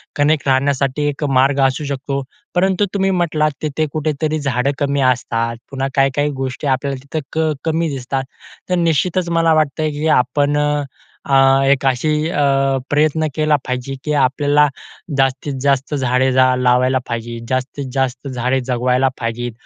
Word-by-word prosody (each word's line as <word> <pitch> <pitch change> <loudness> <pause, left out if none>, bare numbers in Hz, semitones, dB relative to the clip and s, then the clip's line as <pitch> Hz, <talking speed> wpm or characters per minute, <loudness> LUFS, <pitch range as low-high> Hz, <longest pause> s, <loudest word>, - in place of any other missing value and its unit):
Connect 145 0 +1
राहण्यासाठी 135 +1 +1
एक 145 +1 -5 0.2
मार्ग 135 +1 +3
असू 130 +3 -3
शकतो. 140 0 -3 0.3
परंतु 190 +2 +2
तुम्ही 195 -1 +1
म्हटलात 155 -3 +1
तिथे 155 +1 -1
कुठेतरी 155 0 -1
झाडं 140 -1 0
कमी 140 -1 0
असतात, 115 -2 -1
पुन्हा 135 0 -2
काही-काही 135 +1 +2
गोष्टी 130 +2 -4
आपल्याला 135 0 -1
तिथं 140 +3 -4
क 160 -1 +1
कमी 165 0 0
दिसतात. 135 +1 -3 0.5
तर 180 - +2
निश्चितच 170 +3 +1
मला 165 -1 +4
वाटतं, 155 0 +1
की 150 +2 -2
आपण 145 +3 0 0.7
अ, 135 - +3 0.3
एक 140 -1 +2
अशी 150 +4 +1
अ, 145 - -1 0.5
प्रयत्न 155 +1 +2
केला 155 -1 +2
पाहिजे. 125 +1 -3
की 150 - -1
आपल्याला 145 +2 +3 0.5
जास्तीत 135 +1 0
जास्त 140 +1 +1
झाडे 130 -1 +1
लावायला 130 0 +3
पाहिजे, 115 0 -4
जास्तीत 130 +2 -2
जास्त 135 0 -2
झाडे 125 +1 0
जगवायला 125 +1 +2
पाहिजेत. 120 +1 -3
140 Hz, 145 wpm, -18 LUFS, 130-150 Hz, 0.7 s, मला